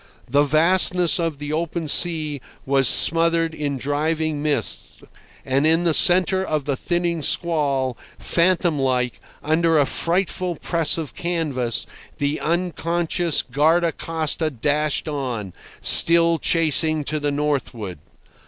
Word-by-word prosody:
The 140 +4 +2
vastness 175 +4 +3
of 165 -3 -2
the 145 +1 -6
open 165 0 -3
sea 155 -3 +1 0.2
was 135 -1 +2
smothered 165 0 +4
in 145 -3 -4
driving 155 +2 -2
mists, 150 -1 -4 0.4
and 135 +3 +1
in 165 +2 +2
the 170 -2 +1
centre 185 +3 +4
of 155 -6 -3
the 140 -2 -1
thinning 175 +2 -2
squall, 140 -6 -1 0.2
phantom 170 -3 +1
like, 125 -2 -1 0.2
under 160 +1 +1
a 145 - +3
frightful 180 +2 -2
press 165 +1 0
of 160 -4 -6
canvas, 140 -9 -2 0.3
the 145 +1 -2
unconscious 170 -1 -1
guardacosta 160 +2 0
dashed 150 +4 -1
on, 125 - -5 0.3
still 170 0 +3
chasing 155 -1 +2
to 155 +2 -3
the 145 0 -2
northward. 135 - -3
155 Hz, 120 wpm, -21 LUFS, 145-170 Hz, 0.4 s, smothered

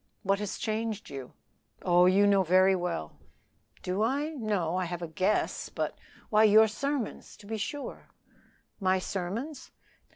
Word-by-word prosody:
"What 195 +1 +1
has 210 -2 -4
changed 220 -2 -3
you?" 135 -2 -8 0.5
"Oh, 180 0 +5
you 195 +2 +5
know 200 -1 +5
very 185 +2 +4
well." 175 - -4 0.6
"Do 185 +3 -1
I? 275 +7 +1
No; 210 - -1
I 185 0 0
have 175 0 -5
a - - -3
guess; 185 +6 0
but - - -3 0.2
" - - -25
"Why 215 0 +5
your 220 +1 +7
sermons, 275 +2 -4
to 205 - -15
be 220 +2 -4
sure." 285 +7 -5 0.7
"My 190 -1 +2
sermons?" 205 - -4
200 Hz, 155 wpm, -29 LUFS, 180-220 Hz, 0.7 s, your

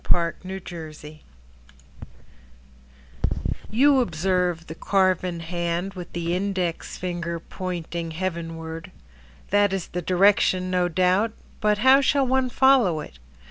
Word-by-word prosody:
Marie 170 -1 +3
Bateson 160 -5 -8 2.5
You 270 +5 +4
observe 180 -4 0
the 160 - -7
carven 185 -1 +1
hand 175 +2 -2
With 180 -2 -9
the 170 0 -2
index 185 -3 -2
finger 170 -2 -3
pointing 170 -1 -5
heavenward. 165 -1 -5 0.6
That 205 0 +4
is 190 -3 -3
the 180 - -3
direction, 185 0 +3
no 180 -1 +2
doubt. 185 +5 +2 0.3
But 210 -1 +2
how 265 +1 +8
shall 275 0 +2
one 260 0 +1
follow 250 -11 +4
it? 65 - -11
180 Hz, 110 wpm, -24 LUFS, 170-195 Hz, 2.5 s, how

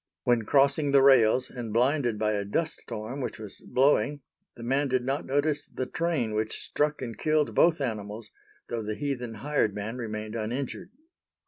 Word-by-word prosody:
When 120 -3 +2
crossing 140 +2 +3
the 135 -1 +6
rails, 130 -2 +5
and 120 -4 -6
blinded 125 0 +2
by 105 0 +1
a 100 -1 -1
dust 160 +11 -1
storm 110 +6 -6
which 125 - -4
was 105 -3 -9
blowing, 145 +2 +2 0.3
the 115 - -10
man 135 +4 +1
did 130 -1 0
not 135 +3 -2
notice 145 +2 0
the 130 - -4
train 155 -8 -1
which 110 0 -2
struck 150 -2 -1
and 115 -3 -5
killed 155 -1 +1
both 170 -2 +4
animals, 110 -4 -4 0.4
though 115 -1 -3
the 105 0 -3
heathen 125 -5 -3
hired 135 -3 0
man 105 +4 -4
remained 110 -1 -5
uninjured. 125 +10 -4
125 Hz, 175 wpm, -28 LUFS, 110-145 Hz, 0.4 s, the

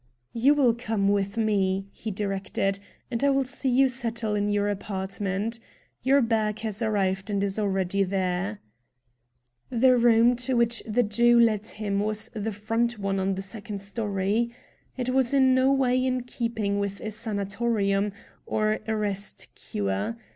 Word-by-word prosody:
"You 265 +6 +4
will 260 -5 +4
come 220 -4 -1
with 200 +1 0
me," 195 -3 +1
he 220 - -6
directed, 195 -1 -2 0.3
"and 235 +2 -1
I 280 - +5
will 275 0 +2
see 265 +1 -2
you 265 +2 +4
settle 235 -4 -2
in 205 0 0
your 205 0 +1
apartment. 195 +2 -3 0.4
Your 275 +1 +4
bag 220 -2 0
has 220 -1 -4
arrived 195 -3 0
and 200 -1 0
is 200 +1 -1
already 195 -1 0
there." 190 +1 -1 1.1
The 255 +1 +4
room 235 0 +5
to 250 +1 0
which 235 -1 +2
the 235 +3 +2
Jew 235 +3 +4
led 220 -2 +3
him 205 -3 -2
was 215 +1 -1
the 220 -1 -3
front 225 +3 -1
one 195 -1 -1
on 190 0 0
the 195 - -4
second 200 0 -6
story. 200 +2 -1 0.5
It 250 -1 -2
was 260 0 +2
in 260 -1 +5
no 260 +1 +4
way 255 -2 +2
in 255 -1 0
keeping 225 -5 -2
with 200 0 -3
a 215 - -4
sanatorium, 205 -1 0 0.4
or 215 0 0
a 220 - 0
rest 205 -1 -3
cure. 100 - -3
215 Hz, 160 wpm, -26 LUFS, 200-235 Hz, 1.1 s, I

